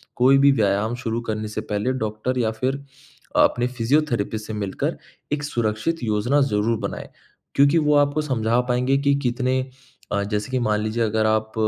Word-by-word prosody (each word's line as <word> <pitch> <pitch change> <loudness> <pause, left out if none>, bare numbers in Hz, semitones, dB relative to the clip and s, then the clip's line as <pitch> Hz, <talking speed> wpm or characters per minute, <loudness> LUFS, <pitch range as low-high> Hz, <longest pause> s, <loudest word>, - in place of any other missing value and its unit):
कोई 130 +2 +5
भी 140 +1 +6
व्यायाम 110 -1 +1
शुरू 115 0 -2
करने 110 -1 -3
से 110 0 -4
पहले 105 +3 -2
डॉक्टर 110 +4 -2
या 110 -2 +1
फ़िर 130 +5 -2 0.5
अपने 120 0 +3
फिज़ियोथेरेपिस्ट 120 -4 0
से 110 - -5
मिलकर 100 -3 -3 0.4
एक 145 0 -2
सुरक्षित 120 +3 -1
योजना 115 +6 +1
ज़रूर 115 -3 +1
बनाएँ। - - -8 0.5
क्योंकि 140 +4 +5
वो 150 -2 +3
आपको 145 +1 +3
समझा 120 -4 0
पाएँगे 125 +3 +2
कि 140 0 +2
कितने 130 +1 +1 0.5
अ, 100 - +1
जैसे 105 +3 -3
कि 130 - +1
मान 105 -1 +1
लीजिए 110 +2 -1
अगर 110 0 +1
आप 110 0 0
120 Hz, 170 wpm, -23 LUFS, 110-135 Hz, 0.5 s, भी